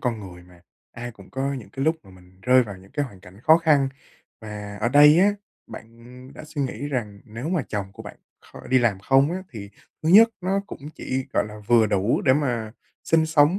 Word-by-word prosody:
con 120 -3 -2
người 90 -3 -11
mà, 90 -1 -19 0.3
ai 120 +1 -7
cũng 100 -4 -17
có 135 +1 -2
những 125 -5 -9
cái 135 - -4
lúc 160 +2 +2
mà - - -17
mình 90 0 -19
rơi 130 +2 +5
vào 105 -4 -8
những 95 +1 -18
cái 145 - -1
hoàn 100 -8 -12
cảnh 95 +2 -16
khó 160 +6 +6
khăn. 150 -5 +2 0.5
Và 105 -2 -8
ở 115 - +1
đây 150 +5 +7
á, 205 +2 +4 0.3
bạn - - -10 0.5
đã - - -10
suy 150 -2 -4
nghĩ 140 +2 -4
rằng 105 -7 -4
nếu 120 +5 -7
mà 175 -5 0
chồng 100 -2 -4
của - - -11
bạn - - -10 0.2
kho - - -14
đi 130 - +3
làm 115 -6 +1
không 135 +8 +3
á 185 +1 -4
thì 100 -4 -9 0.3
thứ 155 - -1
nhất 215 +6 +8
nó 190 +2 0
cũng 140 - -9
chỉ 130 0 -4
gọi - - +1
là 105 0 -10
vừa 115 -1 +4
đủ 100 +1 +1
để 130 - +4
mà 120 -6 -1 0.3
sinh 160 -1 +2
sống 160 +3 +3
125 Hz, 230 wpm, -23 LUFS, 105-150 Hz, 0.5 s, nhất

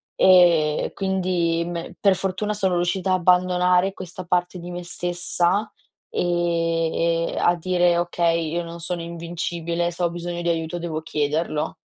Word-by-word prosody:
Ehm, 170 -5 +5
e - - -5
quindi 180 -3 0
me 170 -1 -6
per 200 -2 +4
fortuna 195 +3 -2
sono 190 -3 0
riuscita 180 +2 0
a - - +4
abbandonare 180 +1 +3
questa 185 -1 -8
parte 180 0 0
di 175 +1 -8
me 175 0 -6
stessa 175 +3 0 0.4
ehm, 165 -1 0
ehm, - - -6
a 175 - +3
dire: 175 0 +2
"Okay, 170 -2 0
io 175 +1 -1
non 170 0 -8
sono 175 +1 -3
invincibile. 170 0 -3
Se 175 +1 -4
ho 170 - +1
bisogno 175 0 -5
di 170 - -1
aiuto, 165 0 -2
devo 165 -2 -4
chiederlo." 150 0 -2
175 Hz, 155 wpm, -23 LUFS, 170-180 Hz, 0.4 s, Ehm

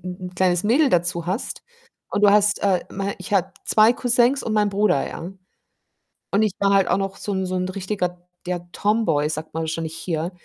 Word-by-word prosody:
'n 180 0 -6
'n - - -20
kleines 180 -1 +2
Mädel 265 +7 +3
dazu 175 -2 0
hast 190 +7 -3 0.5
und 205 - -1
du 205 - +7
hast, 210 0 +3
äh, 190 -3 +2
mein 195 +1 -3
ich - - -8
habe 190 -1 +1
2 215 +2 +5
Cousins 245 +2 +2
und 225 - -3
meinen 210 -1 +2
Bruder, 200 -8 +1
ja? 175 +3 -7 1.0
Und 200 - +2
ich 215 -3 +1
war 200 0 +3
halt 195 -2 +4
auch - - +2
noch 195 0 -3
so 205 - -4
'n 190 -1 -1
so 185 0 -3
'n 185 0 -1
richtiger, 180 -2 -3 0.2
ja, 180 -1 -1
Tomboy 205 -10 +1
sagt 155 0 -5
man 165 - -2
wahrscheinlich 160 0 -4
hier, 165 0 -3
190 Hz, 205 wpm, -22 LUFS, 175-210 Hz, 1.0 s, du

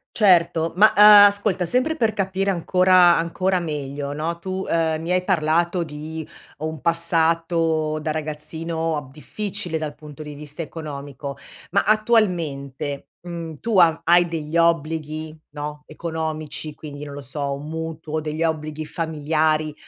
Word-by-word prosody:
Certo 170 -5 +3
ma, 210 +4 +7
uhm, 210 - +6 0.2
ascolta 200 -2 0
sempre 255 - +1
per 225 -5 +1
capire 195 -1 -1
ancora 180 0 +5
ancora 185 +3 0
meglio 145 -3 -4
no? 160 +3 -3
Tu, 190 +2 -4
ehm, 160 -1 +1
mi 165 - -6
hai 180 0 +1
parlato 170 0 +1
di 155 0 -7 0.3
un 155 -1 -5
passato 165 -2 +1
da 155 0 -2
ragazzino, 160 +1 -3
ab 145 -3 -7
difficile 180 +4 -4
dal 155 -2 -5
punto 150 0 -12
di 150 -1 -7
vista 150 +2 -7
economico, 145 -3 -7 0.3
ma 200 +2 +2
attualmente 165 - 0
,mhmm, 170 -2 -6
tu 225 -5 +2
a 165 -2 +4
hai 175 +1 +5
degli 165 -1 -3
obblighi 155 -1 0
no? 150 0 -6
Economici 155 -2 -5
quindi 145 -1 -8
non 145 - -8
lo 145 - -7
so, 140 +1 -3
un 145 +2 -7
mutuo 160 -1 -4
degli 155 +1 -3
obblighi 155 -1 -2
familiari 155 -1 0
160 Hz, 140 wpm, -22 LUFS, 150-175 Hz, 0.3 s, ma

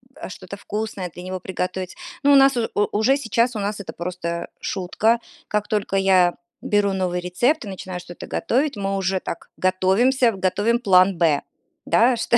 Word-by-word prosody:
а, - - -8
что-то 185 +1 -9
вкусное 205 -3 -4
для 180 - -9
него 185 0 -4
приготовить. 185 0 -4 0.3
Но 285 - +5
у - - +7
нас 270 -1 +6
у 230 - 0 0.3
уже 255 +6 +3
сейчас 240 -2 0
у 215 - -2
нас 205 +1 -2
это 200 - -7
просто 170 -1 -4
шутка. 215 +5 0 0.3
Как 210 0 -1
только 210 -2 -1
я 185 -2 +4 0.3
беру 205 -6 +2
новый 180 -2 -1
рецепт 240 - 0
и - - -6
начинаю 185 -1 -6
что-то 175 0 -10
готовить, 275 +4 0
мы 195 0 -1
уже 190 0 0
так 170 - -7
готовимся, 205 +7 +3
готовим 205 +5 +1
план 190 -4 +4
Б, 160 -4 +3 0.4
да, 240 +2 +4
что 235 - +2
195 Hz, 175 wpm, -22 LUFS, 185-230 Hz, 0.4 s, у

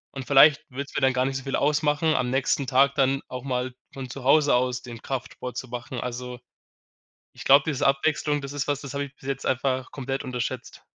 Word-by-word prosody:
und 135 -2 -5
vielleicht 140 +1 +6
wird's 140 +2 -6
mir - - 0
dann 130 - +4
gar 130 0 +1
nicht 135 0 -2
so 135 - -7
viel 135 - -1
ausmachen, 150 +2 +2
am 125 - 0
nächsten 135 +1 0
Tag 135 +1 +3
dann 135 0 +2
auch 125 0 -7
mal 125 -1 -2 0.2
von 135 -2 -7
zu 135 +1 -8
Hause 145 +1 +5
aus 125 0 0
den 120 -2 -10
Kraftsport 125 -2 -5
zu 130 - -5
machen. 125 +1 -6
Also, 125 0 -5 0.9
ich - - -11
glaube, 140 +2 +6
diese 150 -4 0
Abwechslung, 145 +1 +1
das 140 0 -6
ist 145 0 -3
was, 145 0 -1
das 140 -2 -7
habe 140 0 -1
ich 140 -1 -12
bis - - -14
jetzt 135 - -3
einfach 130 0 0
komplett 135 0 -4
unterschätzt. 125 -3 -5
135 Hz, 220 wpm, -25 LUFS, 125-140 Hz, 0.9 s, vielleicht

